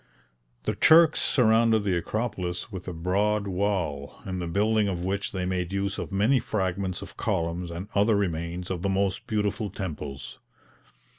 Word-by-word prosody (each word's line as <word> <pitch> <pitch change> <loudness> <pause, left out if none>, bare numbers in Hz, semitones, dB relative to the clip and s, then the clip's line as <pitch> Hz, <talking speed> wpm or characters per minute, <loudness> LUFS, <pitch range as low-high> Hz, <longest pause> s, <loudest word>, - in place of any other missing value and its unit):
The - - 0
Turks 160 -1 +6
surrounded 115 -3 +4
the 95 -3 +1
Acropolis 95 0 -3
with 95 -2 -7
a - - -2
broad 100 +5 0
wall, 90 -7 -1
in 95 -1 -3
the 85 - -3
building 105 +4 +2
of 90 -2 -2
which 100 +1 -1
they 95 -2 -2
made 90 -1 -2
use 100 0 -2
of - - -5
many 110 +7 +3
fragments 95 -3 -2
of - - -11
columns 85 +1 -1
and 85 +4 -6
other 105 +2 +3
remains 85 -2 -2
of 90 -2 -3
the 100 - 0
most 95 0 0
beautiful 105 0 -1
temples. 75 -8 -6
95 Hz, 160 wpm, -27 LUFS, 90-105 Hz, -, Turks